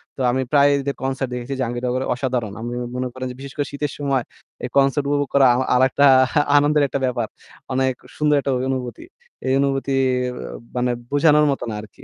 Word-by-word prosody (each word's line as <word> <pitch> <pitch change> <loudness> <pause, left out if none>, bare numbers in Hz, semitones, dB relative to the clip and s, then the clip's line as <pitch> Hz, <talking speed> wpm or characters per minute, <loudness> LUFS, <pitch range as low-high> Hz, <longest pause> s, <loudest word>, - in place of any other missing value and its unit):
তো - - -16
আমি 130 +1 0
প্রায় 145 -1 +5
এদের 140 0 -3
কনসার্ট 135 -1 -2
দেখেছি 125 +2 -4
জাহাঙ্গীরনগরে 125 +1 -2
অসাধারণ। 125 -5 -2
আমি 120 +1 -4 0.2
মনে 130 0 -2
করেন 130 0 -6
যে - - -10
বিশেষ 140 0 -9
করে 145 -2 -1
শীতের 145 0 -3
সময় 135 -4 0 0.4
এই - - -5
কনসার্ট 140 +1 +3
উপভোগ 145 -1 +1
করা 140 -1 +5
আ - - +1 0.2
আরেকটা 130 +3 +4 0.5
আনন্দের 145 +1 +3
একটা 140 - -3
ব্যাপার। 120 -3 -1 0.5
অনেক 130 0 +1 0.2
সুন্দর 150 -1 +3
একটা 135 - -1
ওই 125 - -2
অনুভূতি। 125 - -5 0.4
এই 130 - +2
অনুভূতি 135 0 0 0.4
অ্যা - - -7 0.2
মানে 125 0 +1 0.2
বোঝানোর 150 +1 +4
মতো 135 - -3
না - - -4
আরকি। 105 - -15
135 Hz, 190 wpm, -21 LUFS, 125-140 Hz, 0.5 s, প্রায়